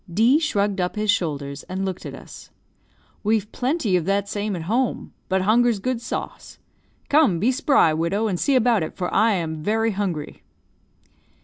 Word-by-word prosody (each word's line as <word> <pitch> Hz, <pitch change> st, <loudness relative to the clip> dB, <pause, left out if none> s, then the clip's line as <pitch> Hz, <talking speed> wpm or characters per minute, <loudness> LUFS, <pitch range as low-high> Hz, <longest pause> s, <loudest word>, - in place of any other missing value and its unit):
D 230 Hz, -, +4 dB
shrugged 205 Hz, -, 0 dB
up 180 Hz, -, -2 dB
his 210 Hz, 0 st, +2 dB
shoulders, 145 Hz, -7 st, -3 dB
and 190 Hz, +1 st, -2 dB
looked 190 Hz, -2 st, -5 dB
at -, -, -7 dB
us. -, -, -12 dB, 0.7 s
"We've 210 Hz, -1 st, 0 dB
plenty 250 Hz, -, 0 dB
of 175 Hz, -3 st, 0 dB
that 200 Hz, +1 st, 0 dB
same 205 Hz, 0 st, -3 dB
at 170 Hz, -, -5 dB
home. 235 Hz, +8 st, -1 dB, 0.2 s
But 190 Hz, 0 st, +1 dB
hunger's 235 Hz, +2 st, +3 dB
good 240 Hz, +4 st, -2 dB
sauce. -, -, -6 dB, 0.5 s
Come, 285 Hz, -, +4 dB
be 230 Hz, +8 st, +2 dB
spry, 270 Hz, -, +3 dB
widow, 170 Hz, +7 st, 0 dB
and 185 Hz, -4 st, -2 dB
see 280 Hz, -, +2 dB
about 240 Hz, -4 st, +3 dB
it, 160 Hz, -, -4 dB
for 180 Hz, -, -3 dB
I 220 Hz, +2 st, +4 dB
am 160 Hz, -4 st, -3 dB
very 225 Hz, +5 st, +1 dB
hungry." 185 Hz, -7 st, -4 dB
205 Hz, 175 wpm, -23 LUFS, 180-230 Hz, 0.7 s, D